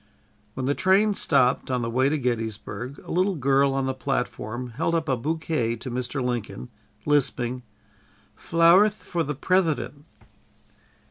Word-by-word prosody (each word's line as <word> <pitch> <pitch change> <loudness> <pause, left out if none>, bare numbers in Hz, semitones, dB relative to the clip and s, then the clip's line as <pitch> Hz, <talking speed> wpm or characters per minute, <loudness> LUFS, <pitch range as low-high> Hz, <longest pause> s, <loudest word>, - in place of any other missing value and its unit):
'" - - -37
When 130 - -3
the 140 - +2
train 195 +6 +3
stopped, 135 -9 +2
on 125 -2 0
the 115 - -2
way 130 +3 +2
to 155 - 0
Gettysburg, 120 +1 -4
a - - -8
little 185 +2 +1
girl 135 -1 +2
on 135 -1 0
the 130 - -1
platform 125 -2 -3
held 165 +7 -1
up 160 -1 -1
a 130 - +2
bouquet 150 -3 -1
to 120 +2 -7
Mr. 125 +2 -3
Lincoln, 120 - -4 0.4
lisping: 130 -4 0 0.7
"Flowerth 175 +6 +4
for 175 - -2
the 150 -2 -2
Prethident." 155 -2 0
135 Hz, 150 wpm, -25 LUFS, 125-160 Hz, 0.7 s, Flowerth